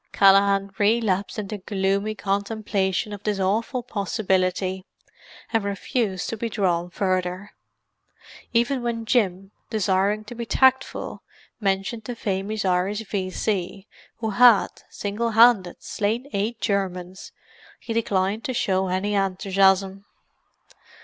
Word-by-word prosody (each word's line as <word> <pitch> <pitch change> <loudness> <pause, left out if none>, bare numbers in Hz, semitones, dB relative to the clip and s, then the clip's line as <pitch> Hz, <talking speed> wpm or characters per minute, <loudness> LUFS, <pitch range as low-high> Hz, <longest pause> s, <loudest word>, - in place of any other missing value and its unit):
Callaghan 195 0 +4
relapsed 205 -2 +1
into 210 0 -4
gloomy 195 +2 -1
contemplation 200 -1 -1
of 205 - -7
this 210 -1 -1
awful 225 +7 0
possibility, 190 -3 -1 0.7
and 225 -2 +2
refused 200 -1 -2
to 225 - -4
be 230 +2 -3
drawn 180 -5 0
further. 185 +2 -2 1.0
Even 240 +3 +1
when 230 -1 -3
Jim, 195 -5 0 0.2
desiring 205 0 +1
to 215 - -9
be 235 0 -5
tactful, 265 +3 +1 0.4
mentioned 205 +3 -2
a 245 - -3
famous 200 0 -2
Irish 190 +3 +1
V.C. 190 0 -2 0.3
who 220 -1 -2
had, 235 -1 +6 0.2
single 210 +3 -2
handed, 225 -5 +4
slain 220 +4 -1
eight 215 +4 -1
Germans, 185 -3 -3 0.5
he 230 - -5
declined 205 -1 0
to 255 - -2
show 190 -3 +1
any 190 +3 -1
enthusiasm. 195 0 +2
200 Hz, 115 wpm, -24 LUFS, 190-220 Hz, 1.0 s, had